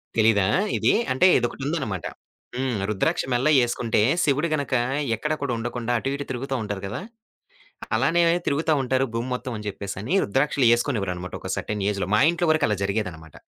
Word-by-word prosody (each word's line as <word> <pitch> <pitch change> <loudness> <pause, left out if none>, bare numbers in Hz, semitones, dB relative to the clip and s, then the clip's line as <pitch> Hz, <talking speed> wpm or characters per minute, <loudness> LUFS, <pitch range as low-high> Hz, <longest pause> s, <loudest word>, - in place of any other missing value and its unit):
తెలీదా 110 -3 +4 0.3
ఇది. - - +3 0.2
అంటే 130 +8 +4
ఇదొకటుందన్నమాట. 130 - -2 0.5
హ్మ్. 130 -3 -1
రుద్రాక్ష 105 -3 0
మెళ్ళో 125 +5 +2
ఏసుకుంటే, 115 -2 0 0.2
శివుడు 145 +3 +1
గనక 140 -3 -3 0.4
ఎక్కడ 150 +8 -2
కూడా 140 -4 -1
ఉండకుండా 120 +1 -3
అటు, 135 - -2
ఇటు 145 0 -5
తిరుగుతా 135 +2 -3
ఉంటారు 105 -2 -5
కదా! 105 - -5 0.9
అలానే 170 +1 +2 0.3
తిరుగుతా 155 +3 +1
ఉంటారు 130 +1 +1
భూమి 115 +2 -2
మొత్తం 125 0 -5
అని 105 0 -8
చెప్పేసని 100 - -4
రుద్రాక్షలు 135 +3 +1
ఏసుకొనేవ్వరనమాట. 100 -8 -2
ఒక - - -7
సర్టన్ 105 -2 -3
ఏజ్‌లో. 100 -3 -2
మా 105 - +4
ఇంట్లో 175 0 -1
వరకు 155 -1 +1
అలా 105 - 0
జరిగేదనమాట. 95 -7 -4
120 Hz, 155 wpm, -24 LUFS, 105-140 Hz, 0.9 s, తెలీదా